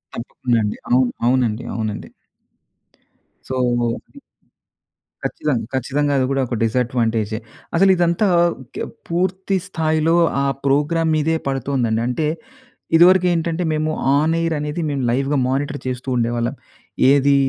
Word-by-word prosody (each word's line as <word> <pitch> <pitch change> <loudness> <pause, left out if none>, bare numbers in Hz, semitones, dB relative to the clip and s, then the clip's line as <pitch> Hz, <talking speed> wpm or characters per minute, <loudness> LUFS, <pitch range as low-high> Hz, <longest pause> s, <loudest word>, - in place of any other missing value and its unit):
తప్పకుండా 120 0 -2
అండి. 105 - -2
అవును. 125 0 +4 0.2
అవునండి, 120 -3 +1
అవునండి. 110 -2 -4 1.4
సో 120 -2 0 1.2
ఖచ్చితంగా, 130 -7 -1
ఖచ్చితంగా. 140 +3 0
అది 130 - +2
కూడా 135 - +1
ఒక 120 - -3
డిసాడ్వాంటేజే. 115 -2 0 0.4
అసలు 195 +3 +5
ఇదంతా 175 +4 +2 0.2
ఓకే. 130 -7 -8 0.3
పూర్తి 185 +3 0
స్థాయిలో 160 -2 +1 0.3
ఆ 140 - +1 0.2
ప్రోగ్రామ్ 160 +4 +2
మీదే 155 +1 +1
పడుతుందండి. 130 -4 0
అంటే 150 +5 -1 0.7
ఇదివరకేంటంటే 175 -1 +4
మేము 155 0 0 0.3
ఆన్ 155 +3 +2
ఎయిర్ 165 0 0
అనేది 150 +3 -3
మేము 140 -2 -2
లైవ్‌గా 135 +4 +1
మానిటర్ 145 +2 -1
చేస్తూ 125 +1 -4
ఉండేవాళ్ళం. 120 0 -1 0.6
ఏది 140 0 +4
140 Hz, 115 wpm, -20 LUFS, 120-160 Hz, 1.4 s, అసలు